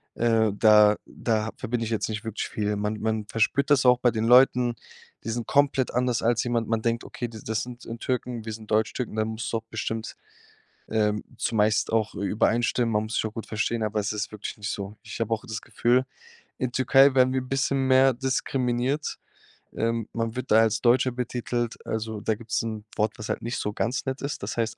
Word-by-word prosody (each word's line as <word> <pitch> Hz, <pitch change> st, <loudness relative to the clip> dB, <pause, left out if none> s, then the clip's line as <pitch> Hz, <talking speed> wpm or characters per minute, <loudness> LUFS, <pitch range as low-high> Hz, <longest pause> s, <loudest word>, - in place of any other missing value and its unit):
Äh, 115 Hz, -2 st, +2 dB
da 105 Hz, 0 st, +6 dB
da 110 Hz, -2 st, -1 dB
ha -, -, -4 dB
verbinde 120 Hz, -2 st, -2 dB
ich -, -, -4 dB
jetzt 110 Hz, -, 0 dB
nicht 110 Hz, 0 st, -4 dB
wirklich 110 Hz, -1 st, -3 dB
viel. 105 Hz, -1 st, -2 dB
Man 105 Hz, +1 st, -2 dB
man 110 Hz, -1 st, -1 dB
verspürt 130 Hz, +7 st, +1 dB
das 140 Hz, -2 st, +5 dB
auch 125 Hz, 0 st, +6 dB
bei 120 Hz, -2 st, +3 dB
den 110 Hz, 0 st, -1 dB
Leuten, 125 Hz, 0 st, +5 dB, 0.5 s
die 115 Hz, -, -5 dB
sind 115 Hz, 0 st, -3 dB
komplett 140 Hz, -2 st, +2 dB
anders 125 Hz, -1 st, 0 dB
als 115 Hz, 0 st, +2 dB
jemand. 120 Hz, -2 st, -1 dB
Man 115 Hz, -1 st, -1 dB
denkt: 115 Hz, 0 st, 0 dB
„Okay, 120 Hz, -, -5 dB
die 110 Hz, -, -10 dB
das 110 Hz, -1 st, -1 dB
sind, 125 Hz, 0 st, -9 dB
äh, 115 Hz, -, -5 dB
Türken, 125 Hz, -2 st, -3 dB
wir 110 Hz, -, -4 dB
sind 110 Hz, 0 st, -10 dB
Deutschtürken, 110 Hz, +2 st, 0 dB
da 110 Hz, 0 st, +1 dB
musst 110 Hz, +1 st, -4 dB
du 115 Hz, -, +1 dB
auch 110 Hz, -, -7 dB
bestimmt, 110 Hz, 0 st, -4 dB, 0.7 s
ähm, 105 Hz, -1 st, 0 dB
zumeist 110 Hz, -1 st, +1 dB
auch 110 Hz, -2 st, +1 dB
ü 100 Hz, -, -5 dB
übereinstimmen. 115 Hz, +3 st, +1 dB
Man 105 Hz, 0 st, +1 dB
muss 110 Hz, +1 st, -5 dB
sich -, -, 0 dB
auch 110 Hz, -, -4 dB
gut 115 Hz, -2 st, -6 dB
verstehen“, 115 Hz, +1 st, -1 dB
aber 105 Hz, 0 st, 0 dB
es 100 Hz, 0 st, -1 dB
ist 105 Hz, 0 st, -3 dB
wirklich 105 Hz, -1 st, -6 dB
nicht 105 Hz, -1 st, -4 dB
so. 100 Hz, 0 st, -5 dB
Ich -, -, -8 dB
habe 115 Hz, 0 st, 0 dB
auch 110 Hz, -, -3 dB
das 110 Hz, 0 st, -4 dB
Gefühl, 125 Hz, +2 st, +1 dB, 0.5 s
in 130 Hz, -1 st, -1 dB
Türkei 135 Hz, +2 st, +5 dB
werden 130 Hz, 0 st, +4 dB
wir 130 Hz, -, +1 dB
bisschen 135 Hz, +1 st, 0 dB
mehr 130 Hz, 0 st, +5 dB
diskriminiert. 130 Hz, +1 st, -1 dB, 0.6 s
Ähm, 115 Hz, 0 st, -1 dB
man 115 Hz, -1 st, -2 dB
wird 130 Hz, +1 st, -5 dB
da 110 Hz, +1 st, +7 dB
als 110 Hz, 0 st, +1 dB
Deutscher 125 Hz, +1 st, +3 dB
betitelt, 120 Hz, -1 st, -2 dB
also, 110 Hz, -1 st, -3 dB
da 110 Hz, +1 st, 0 dB
gibt's 115 Hz, +1 st, -2 dB
'n 110 Hz, -2 st, -4 dB
Wort, 105 Hz, 0 st, +1 dB
was 110 Hz, -, -6 dB
halt -, -, -2 dB
nicht 120 Hz, +2 st, -3 dB
so 105 Hz, -, -2 dB
ganz 120 Hz, +7 st, -2 dB
nett 135 Hz, 0 st, -3 dB
ist, 140 Hz, +1 st, -4 dB
das -, -, -4 dB
heißt. 115 Hz, -1 st, -1 dB
115 Hz, 220 wpm, -26 LUFS, 110-125 Hz, 0.7 s, da